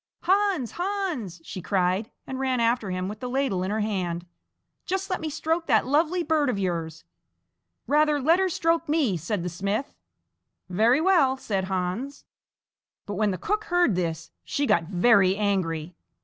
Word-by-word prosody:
"Hans, 385 Hz, -, +2 dB
Hans!" 350 Hz, -, -3 dB
she 185 Hz, -, -7 dB
cried, 185 Hz, +3 st, 0 dB, 0.2 s
and 265 Hz, 0 st, -5 dB
ran 260 Hz, -2 st, 0 dB
after 230 Hz, -3 st, +1 dB
him 185 Hz, 0 st, -2 dB
with 210 Hz, +2 st, -6 dB
the 250 Hz, -, -5 dB
ladle 260 Hz, -8 st, 0 dB
in 185 Hz, -, -2 dB
her 215 Hz, +1 st, -1 dB
hand; 180 Hz, -5 st, -2 dB, 0.6 s
"just 385 Hz, +1 st, -2 dB
let 370 Hz, -, -1 dB
me 315 Hz, -, -2 dB
stroke 325 Hz, +3 st, -1 dB
that -, -, +3 dB
lovely 320 Hz, +6 st, +1 dB
bird 310 Hz, -3 st, +1 dB
of 245 Hz, -, -1 dB
yours." 165 Hz, -4 st, -3 dB, 0.8 s
"Rather 300 Hz, 0 st, +3 dB
let 325 Hz, +6 st, +4 dB
her 380 Hz, 0 st, +2 dB
stroke 330 Hz, -1 st, 0 dB
me!" 295 Hz, -, +2 dB
said 175 Hz, +3 st, -3 dB
the -, -, -2 dB
smith. 200 Hz, +9 st, -2 dB, 0.7 s
"Very 225 Hz, -, +3 dB
well," 320 Hz, -8 st, +4 dB
said 195 Hz, -7 st, -2 dB
Hans. 190 Hz, +9 st, -3 dB, 0.8 s
But 205 Hz, -, -5 dB
when 210 Hz, +1 st, +1 dB
the 185 Hz, -, -2 dB
cook 420 Hz, -, -2 dB
heard 350 Hz, -, +3 dB
this, 165 Hz, -2 st, -3 dB
she 285 Hz, -, -1 dB
got 170 Hz, -10 st, +2 dB
very 190 Hz, +1 st, +4 dB
angry. 180 Hz, -5 st, -1 dB
230 Hz, 165 wpm, -26 LUFS, 185-310 Hz, 0.8 s, let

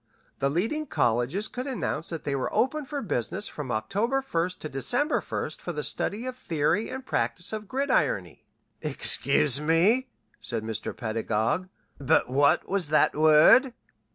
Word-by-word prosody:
The 140 Hz, -, +1 dB
leading 225 Hz, -, -1 dB
colleges 130 Hz, -, +1 dB
could 250 Hz, +2 st, -6 dB
announce 220 Hz, -, -3 dB
that 165 Hz, -2 st, -5 dB
they 140 Hz, -, -2 dB
were 130 Hz, -, -2 dB
open 295 Hz, +3 st, 0 dB
for 285 Hz, 0 st, -5 dB
business 180 Hz, -, -2 dB
from 140 Hz, -4 st, -6 dB
October 210 Hz, -, -1 dB
1st 180 Hz, -6 st, -2 dB
to -, -, -6 dB
December 135 Hz, -, +1 dB
1st -, -, -5 dB
for -, -, -4 dB
the -, -, -3 dB
study 220 Hz, +5 st, -1 dB
of 255 Hz, -, -3 dB
the 250 Hz, -, -24 dB
Theory 165 Hz, +7 st, 0 dB
and 260 Hz, 0 st, -6 dB
Practice 175 Hz, -5 st, -2 dB
of 215 Hz, -1 st, -5 dB
Gridirony 280 Hz, -, 0 dB, 0.2 s
" -, -, -46 dB
"Excuse 145 Hz, -1 st, +2 dB
me," 190 Hz, +12 st, +2 dB, 0.3 s
said 115 Hz, -2 st, -4 dB
Mr. 110 Hz, -1 st, -5 dB
Pedagog. 115 Hz, -, -1 dB, 0.3 s
"But 135 Hz, -, +2 dB
what 140 Hz, +2 st, +3 dB
was 190 Hz, -6 st, -1 dB
that 155 Hz, -, +3 dB
word?" 155 Hz, -, +6 dB
170 Hz, 160 wpm, -27 LUFS, -, 0.3 s, word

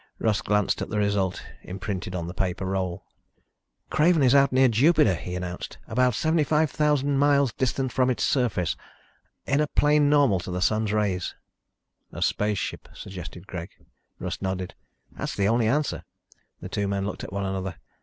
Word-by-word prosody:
Russ 110 Hz, -1 st, +1 dB
glanced 105 Hz, -1 st, +1 dB
at -, -, -3 dB
the 105 Hz, -, -2 dB
result 100 Hz, -3 st, 0 dB, 0.2 s
imprinted 95 Hz, -1 st, -5 dB
on 85 Hz, -2 st, -3 dB
the 85 Hz, -, -6 dB
paper 95 Hz, 0 st, -2 dB
roll. 95 Hz, -2 st, -2 dB, 0.9 s
"Craven 155 Hz, -1 st, +4 dB
is 125 Hz, -1 st, +5 dB
out 140 Hz, -1 st, +5 dB
near 130 Hz, +1 st, +5 dB
Jupiter," 120 Hz, -, +4 dB
he 90 Hz, +1 st, -5 dB
announced. 90 Hz, 0 st, -5 dB
"About 125 Hz, 0 st, +2 dB
75,000 150 Hz, -2 st, +2 dB
miles 140 Hz, -3 st, +3 dB
distant 130 Hz, 0 st, -1 dB
from 130 Hz, +1 st, +2 dB
its 125 Hz, -, 0 dB
surface, 115 Hz, -, +1 dB, 0.7 s
in 140 Hz, +3 st, +2 dB
a 150 Hz, -, +1 dB
plane 145 Hz, 0 st, +3 dB
normal 140 Hz, -10 st, +4 dB
to 85 Hz, -, -7 dB
the 90 Hz, 0 st, -2 dB
Sun's 110 Hz, +3 st, +1 dB
rays." 100 Hz, -4 st, -1 dB, 0.8 s
"A -, -, -3 dB
spaceship," 105 Hz, -1 st, -1 dB
suggested 90 Hz, -1 st, -8 dB
Greg. 90 Hz, -3 st, -6 dB, 0.5 s
Russ -, -, -5 dB
nodded. 95 Hz, -1 st, -3 dB, 0.4 s
"That's -, -, -5 dB
the 100 Hz, 0 st, +1 dB
only 115 Hz, +1 st, +2 dB
answer." 145 Hz, +5 st, 0 dB, 0.6 s
The -, -, -7 dB
two 100 Hz, -1 st, -1 dB
men 100 Hz, 0 st, -1 dB
looked 105 Hz, -, -5 dB
at -, -, -7 dB
one 100 Hz, 0 st, -2 dB
another. 95 Hz, -1 st, -3 dB
105 Hz, 165 wpm, -26 LUFS, 95-135 Hz, 0.9 s, is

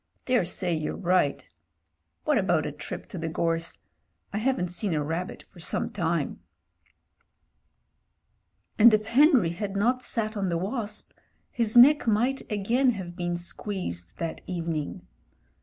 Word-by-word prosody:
"Daresay 185 Hz, -7 st, +1 dB
you're 155 Hz, -1 st, -3 dB
right 180 Hz, -5 st, +1 dB, 0.8 s
What -, -, +2 dB
about -, -, +1 dB
a -, -, -3 dB
trip -, -, -7 dB
to -, -, -6 dB
the 165 Hz, 0 st, -3 dB
gorse? 165 Hz, +1 st, -1 dB, 0.5 s
I 210 Hz, -, -1 dB
haven't 235 Hz, -6 st, 0 dB
seen 180 Hz, -1 st, -1 dB
a 150 Hz, -, 0 dB
rabbit 165 Hz, +5 st, -4 dB
for 175 Hz, -, -16 dB
some 165 Hz, -, -2 dB
time." 165 Hz, -5 st, -1 dB, 2.4 s
And 230 Hz, +2 st, +9 dB
if 215 Hz, 0 st, -2 dB
Henry 250 Hz, -, +5 dB
had 200 Hz, +3 st, -4 dB
not 245 Hz, +5 st, +2 dB
sat 220 Hz, -3 st, -2 dB
on 195 Hz, -3 st, -1 dB
the 170 Hz, -, 0 dB
wasp, 210 Hz, +3 st, -4 dB, 0.4 s
his 230 Hz, -1 st, +1 dB
neck 275 Hz, +2 st, +7 dB
might 240 Hz, +5 st, +2 dB
again 240 Hz, +6 st, +2 dB
have 180 Hz, -4 st, -7 dB
been 175 Hz, -1 st, -2 dB
squeezed 140 Hz, -, -5 dB
that 165 Hz, -1 st, -4 dB
evening. 165 Hz, -4 st, -3 dB
190 Hz, 140 wpm, -27 LUFS, 170-225 Hz, 2.4 s, And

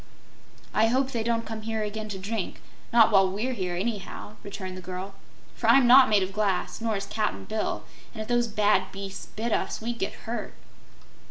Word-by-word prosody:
"I 220 Hz, -, +4 dB
hope 260 Hz, +3 st, +1 dB
they 235 Hz, -, -1 dB
don't 230 Hz, 0 st, 0 dB
come 220 Hz, 0 st, -5 dB
here 220 Hz, 0 st, -2 dB
again 215 Hz, +1 st, -4 dB
to 200 Hz, -, -4 dB
drink, 200 Hz, +1 st, -4 dB, 0.3 s
not 230 Hz, -1 st, +6 dB
while 195 Hz, -2 st, +5 dB
we're 220 Hz, +7 st, -2 dB
here, 185 Hz, -6 st, -2 dB
anyhow," 205 Hz, +1 st, -4 dB
returned 190 Hz, -2 st, -6 dB
the 185 Hz, -, -7 dB
girl, 185 Hz, +2 st, -6 dB, 0.4 s
"for -, -, -3 dB
I'm 270 Hz, -2 st, +7 dB
not 260 Hz, +2 st, +8 dB
made 205 Hz, -3 st, +4 dB
of 190 Hz, +1 st, -4 dB
glass, 205 Hz, 0 st, 0 dB
nor 225 Hz, -2 st, 0 dB
is 195 Hz, -, -4 dB
Cap'n 210 Hz, +1 st, -2 dB
Bill, 215 Hz, 0 st, -2 dB, 0.3 s
and 230 Hz, -, -10 dB
if 215 Hz, -, -4 dB
those 240 Hz, -1 st, +2 dB
bad 210 Hz, -3 st, +2 dB
beasts 195 Hz, 0 st, -7 dB
bit 225 Hz, +2 st, -4 dB
us, -, -, -1 dB
we'd 235 Hz, +1 st, -4 dB
get 195 Hz, -, -2 dB
hurt." 235 Hz, +1 st, -4 dB
215 Hz, 195 wpm, -27 LUFS, 195-230 Hz, 0.4 s, not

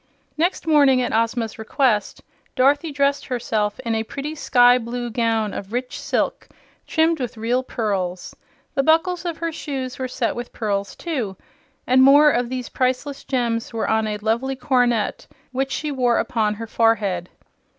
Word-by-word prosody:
Next 340 Hz, +3 st, 0 dB
morning, 285 Hz, -5 st, +5 dB
at -, -, -2 dB
Ozma's 230 Hz, 0 st, 0 dB
request, 220 Hz, -2 st, 0 dB, 0.3 s
Dorothy 285 Hz, +5 st, +3 dB
dressed 280 Hz, 0 st, 0 dB
herself 220 Hz, -4 st, -1 dB
in 230 Hz, -3 st, -2 dB
a 220 Hz, -, 0 dB
pretty 280 Hz, +7 st, -5 dB
sky 245 Hz, -4 st, +4 dB
blue 240 Hz, 0 st, -4 dB
gown 225 Hz, -2 st, 0 dB
of 195 Hz, 0 st, -7 dB
rich 250 Hz, +1 st, -3 dB
silk, -, -, -1 dB, 0.4 s
trimmed 320 Hz, 0 st, +2 dB
with 245 Hz, -2 st, -4 dB
real 235 Hz, +3 st, 0 dB
pearls. 195 Hz, -8 st, -3 dB, 0.4 s
The 275 Hz, -, +2 dB
buckles 335 Hz, +5 st, +2 dB
of 335 Hz, -2 st, -3 dB
her 335 Hz, 0 st, -2 dB
shoes 265 Hz, -5 st, -5 dB
were 260 Hz, -, -2 dB
set 250 Hz, -2 st, -2 dB
with 240 Hz, 0 st, -6 dB
pearls, 200 Hz, -3 st, -2 dB
too, 245 Hz, -, -4 dB, 0.5 s
and 255 Hz, +1 st, +4 dB
more 290 Hz, +3 st, +7 dB
of 245 Hz, -2 st, 0 dB
these 255 Hz, -1 st, -4 dB
priceless 260 Hz, +2 st, -1 dB
gems 235 Hz, -3 st, -1 dB
were 225 Hz, -, -1 dB
on 220 Hz, 0 st, +1 dB
a 210 Hz, -1 st, -2 dB
lovely 230 Hz, +6 st, -1 dB
coronet 245 Hz, -5 st, 0 dB, 0.2 s
which 265 Hz, +1 st, -1 dB
she 305 Hz, -1 st, -2 dB
wore 250 Hz, -3 st, +2 dB
upon 215 Hz, -3 st, 0 dB
her 225 Hz, +2 st, -6 dB
forehead. 210 Hz, -6 st, +1 dB
245 Hz, 160 wpm, -22 LUFS, 225-275 Hz, 0.5 s, more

